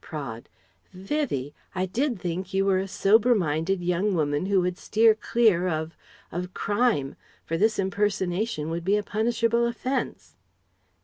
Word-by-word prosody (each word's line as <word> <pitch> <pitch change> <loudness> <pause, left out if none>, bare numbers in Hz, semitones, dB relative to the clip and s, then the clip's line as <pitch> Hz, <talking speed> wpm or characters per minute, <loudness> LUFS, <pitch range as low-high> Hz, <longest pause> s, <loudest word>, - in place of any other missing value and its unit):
Praed: 135 -7 -7 0.4
"Vivie! 185 - -2 0.2
I 185 0 0
did 240 +4 -1
think 180 +2 -4
you 195 0 +2
were 190 -1 +3
a 190 - -3
sober 220 +5 +4
minded 175 +1 0
young 180 +3 +1
woman 145 +2 0
who 200 -1 +3
would 180 +1 -2
steer 220 +1 +4
clear 215 -5 +2
of 160 -1 -3 0.4
of 180 +2 -5
crime: 205 - 0 0.3
for 165 - -2
this 215 +5 +2
impersonation 190 -3 -1
would 170 0 -3
be 200 +4 +2
a 210 - -1
punishable 230 +2 +1
offence..." 235 - -4
190 Hz, 145 wpm, -26 LUFS, 170-220 Hz, 0.4 s, sober